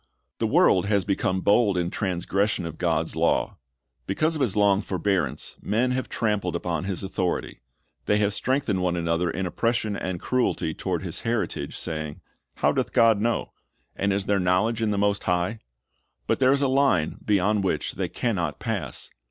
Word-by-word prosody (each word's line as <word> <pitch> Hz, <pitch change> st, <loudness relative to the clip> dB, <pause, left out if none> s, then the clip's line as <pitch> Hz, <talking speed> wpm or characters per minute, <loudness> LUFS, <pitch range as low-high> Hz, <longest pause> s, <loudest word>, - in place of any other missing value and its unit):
"'' -, -, -53 dB
The -, -, +1 dB
world 90 Hz, +1 st, +4 dB
has 100 Hz, -3 st, +2 dB
become 95 Hz, -1 st, 0 dB
bold 100 Hz, -1 st, +3 dB
in 85 Hz, 0 st, -1 dB
transgression 95 Hz, 0 st, -1 dB
of 80 Hz, -1 st, -7 dB
God's -, -, 0 dB
law. -, -, +1 dB, 0.5 s
Because 155 Hz, +12 st, +1 dB
of 155 Hz, -, -3 dB
His 120 Hz, -8 st, +1 dB
long 100 Hz, -1 st, +4 dB
forbearance, 95 Hz, -2 st, -1 dB
men 120 Hz, +4 st, +1 dB
have 130 Hz, 0 st, -2 dB
trampled 105 Hz, -6 st, -1 dB
upon 85 Hz, 0 st, -2 dB
His 95 Hz, 0 st, -3 dB
authority. 95 Hz, -2 st, -2 dB, 0.5 s
They 105 Hz, -, +3 dB
have 105 Hz, -1 st, +1 dB
strengthened 120 Hz, -5 st, 0 dB
one 90 Hz, -1 st, +1 dB
another 85 Hz, +1 st, 0 dB
in 95 Hz, +4 st, -2 dB
oppression 110 Hz, +3 st, 0 dB
and 95 Hz, -3 st, -3 dB
cruelty 125 Hz, -10 st, 0 dB
toward -, -, -3 dB
His -, -, -4 dB
heritage, 115 Hz, -1 st, -2 dB
saying, 75 Hz, -2 st, -4 dB, 0.3 s
"How -, -, +2 dB
doth -, -, -1 dB
God 115 Hz, -3 st, +5 dB
know? 115 Hz, +1 st, -1 dB, 0.4 s
and 100 Hz, +1 st, 0 dB
is 100 Hz, 0 st, 0 dB
there 100 Hz, -1 st, +2 dB
knowledge 95 Hz, +6 st, +1 dB
in 110 Hz, -, +1 dB
the 105 Hz, -, 0 dB
Most 100 Hz, 0 st, +1 dB
High?"^ 90 Hz, +5 st, 0 dB, 0.7 s
But -, -, 0 dB
there 130 Hz, -1 st, +5 dB
is 140 Hz, +1 st, +2 dB
a -, -, +3 dB
line 130 Hz, -, +2 dB
beyond 105 Hz, 0 st, +2 dB
which 80 Hz, -6 st, -1 dB
they 90 Hz, -2 st, -3 dB
can 115 Hz, +6 st, -1 dB
not 85 Hz, -4 st, -2 dB
pass. -, -, -3 dB
100 Hz, 180 wpm, -25 LUFS, 90-110 Hz, 0.7 s, God